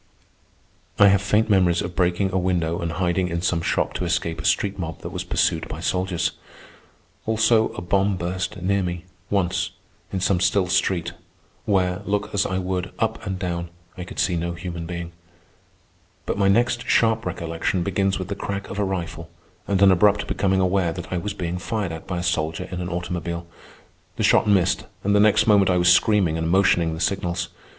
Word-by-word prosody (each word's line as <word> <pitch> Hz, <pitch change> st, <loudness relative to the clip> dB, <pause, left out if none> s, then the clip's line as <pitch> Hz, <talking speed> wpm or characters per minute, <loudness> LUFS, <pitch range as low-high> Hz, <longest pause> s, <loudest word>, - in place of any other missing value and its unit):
I 100 Hz, -1 st, +7 dB
have 100 Hz, 0 st, +3 dB
faint 105 Hz, +2 st, +2 dB
memories 90 Hz, -5 st, +3 dB
of 85 Hz, 0 st, -6 dB
breaking 90 Hz, +2 st, +1 dB
a -, -, +2 dB
window 85 Hz, -2 st, 0 dB
and 85 Hz, -1 st, -3 dB
hiding 90 Hz, +1 st, 0 dB
in 85 Hz, -1 st, -3 dB
some 85 Hz, -1 st, +1 dB
shop -, -, 0 dB
to -, -, -3 dB
escape 85 Hz, -2 st, -1 dB
a -, -, -9 dB
street 100 Hz, -1 st, +1 dB
mob 80 Hz, -3 st, -5 dB
that -, -, -6 dB
was -, -, -4 dB
pursued -, -, 0 dB
by -, -, -7 dB
soldiers. 90 Hz, -1 st, -1 dB, 1.0 s
Also, 110 Hz, 0 st, +3 dB
a 90 Hz, -, -6 dB
bomb 95 Hz, +2 st, +1 dB
burst 90 Hz, +2 st, -3 dB
near 100 Hz, +1 st, +2 dB
me, 90 Hz, -1 st, -4 dB, 0.2 s
once, 95 Hz, -3 st, 0 dB, 0.4 s
in 95 Hz, -, -2 dB
some 95 Hz, 0 st, +1 dB
still 95 Hz, +1 st, +2 dB
street, 90 Hz, -1 st, 0 dB, 0.5 s
where, 90 Hz, -1 st, +1 dB
look 105 Hz, +1 st, -2 dB
as 100 Hz, -1 st, +1 dB
I 95 Hz, -, -2 dB
would, 95 Hz, 0 st, -2 dB
up 110 Hz, 0 st, -1 dB
and 95 Hz, -1 st, -2 dB
down, 85 Hz, -2 st, -3 dB, 0.3 s
I 90 Hz, -, -6 dB
could 90 Hz, -, -10 dB
see 90 Hz, -, +1 dB
no 85 Hz, +1 st, -2 dB
human 85 Hz, -1 st, -6 dB
being. 85 Hz, -1 st, -5 dB, 1.1 s
But -, -, -2 dB
my 100 Hz, -, +3 dB
next 120 Hz, +4 st, +2 dB
sharp 115 Hz, -1 st, +3 dB
recollection 85 Hz, +2 st, -2 dB
begins 95 Hz, +1 st, 0 dB
with 95 Hz, -, -5 dB
the 100 Hz, -, -3 dB
crack 100 Hz, 0 st, -5 dB
of 100 Hz, -, -4 dB
a -, -, +2 dB
rifle 85 Hz, -3 st, -4 dB, 0.4 s
and 100 Hz, -2 st, +1 dB
an 95 Hz, -, +7 dB
abrupt 100 Hz, +2 st, +3 dB
becoming 95 Hz, -1 st, +1 dB
aware 90 Hz, -2 st, +1 dB
that -, -, -8 dB
I -, -, 0 dB
am 85 Hz, -, -5 dB
being 90 Hz, 0 st, -3 dB
fired 100 Hz, -1 st, -3 dB
at 80 Hz, -1 st, -8 dB
by 90 Hz, -, -3 dB
a 85 Hz, -, -3 dB
soldier 85 Hz, 0 st, -1 dB
in 90 Hz, 0 st, -4 dB
an 90 Hz, -, -4 dB
automobile. 85 Hz, -1 st, -4 dB, 0.7 s
The -, -, -2 dB
shot -, -, +4 dB
missed, 95 Hz, -3 st, +2 dB, 0.2 s
and 100 Hz, +1 st, +2 dB
the -, -, +5 dB
next 105 Hz, 0 st, +4 dB
moment 100 Hz, -3 st, +4 dB
I 90 Hz, -, +3 dB
was 90 Hz, 0 st, +6 dB
screaming 95 Hz, -6 st, +2 dB
and 80 Hz, 0 st, -1 dB
motioning 85 Hz, -3 st, +3 dB
the -, -, -8 dB
signals. 90 Hz, -2 st, -1 dB
90 Hz, 195 wpm, -23 LUFS, 85-100 Hz, 1.1 s, I